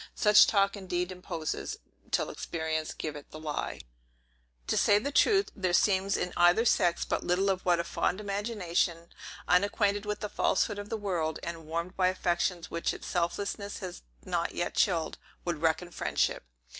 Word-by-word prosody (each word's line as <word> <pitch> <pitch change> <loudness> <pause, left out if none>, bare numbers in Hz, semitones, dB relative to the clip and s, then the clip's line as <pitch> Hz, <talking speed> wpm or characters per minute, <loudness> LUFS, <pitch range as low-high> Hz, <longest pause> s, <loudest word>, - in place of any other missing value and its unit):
Such 210 -1 +7
talk 200 -1 +3
indeed 180 -2 -2
imposes, 175 -3 -4 0.3
till - - 0
experience 160 -1 -3
give 155 -2 -5
it 145 - -10
the 155 - -9
lie. 155 -2 -4 0.8
To - - 0
say 205 - +5
the 275 +7 -2
truth, 395 +6 +4
there 185 -4 -1
seems 195 +1 +3
in 180 - -2
either 175 +6 +5
sex 175 -6 +2
but - - -1
little 190 +3 +2
of 185 -1 -2
what 175 -2 +3
a - - +1
fond 185 - -1
imagination, 195 -5 -1 0.4
unacquainted 205 +2 +2
with 210 - -3
the 210 - -2
falsehood 205 0 +1
of 205 0 -7
the 225 - -2
world, 175 -6 -1
and 165 -2 -6
warmed 170 +3 -3
by 185 -1 +3
affections 175 -1 -1
which 170 - -1
its - - -10
selfishness 200 +4 -2
has 185 -3 -7 0.2
not - - -1
yet - - -1
chilled, 165 -3 +1 0.3
would 170 -3 -2
reckon 165 +2 +1
friendship. - - -1
180 Hz, 170 wpm, -30 LUFS, 170-205 Hz, 0.8 s, Such